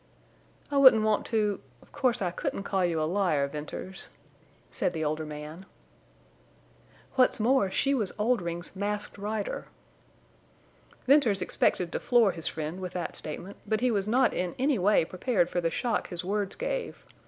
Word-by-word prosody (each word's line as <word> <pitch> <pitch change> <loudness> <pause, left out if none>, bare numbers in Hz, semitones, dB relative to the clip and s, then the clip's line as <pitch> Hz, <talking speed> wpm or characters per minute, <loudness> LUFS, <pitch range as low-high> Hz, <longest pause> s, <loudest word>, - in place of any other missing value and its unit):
"I 285 - +1
wouldn't 260 -6 +8
want 215 -1 +1
to—of 200 - -3
course, 250 -6 +1
I 175 - 0
couldn't 195 - -3
call 195 -1 0
you 170 -2 +1
a - - +1
liar, 165 -5 +1
Venters," 150 +6 -6 0.6
said 175 - -1
the 160 -2 -2
older 155 +1 -2
man. 150 +5 -8 1.5
"What's 255 -2 +3
more, 235 -2 +3
she 275 +8 +1
was 220 -8 +1
Oldring's 185 -7 -1
Masked 205 +1 -3
Rider!" 210 0 -3 1.4
Venters 245 -9 +4
expected 180 -1 +1
to - - -2
floor 235 -5 +4
his 165 -2 -6
friend 155 +3 -4
with 185 -1 -5
that 175 -2 -4
statement, 175 +6 -7
but 220 0 0
he 250 -1 +3
was 200 -2 0
not 250 +4 +3
in 180 -1 -2
any 265 -2 +1
way 190 -2 +4
prepared 185 -1 0
for 175 - 0
the 165 - +1
shock 235 +6 -1
his 175 -1 -4
words 200 0 -1
gave. - - -4
195 Hz, 160 wpm, -28 LUFS, 170-225 Hz, 1.5 s, wouldn't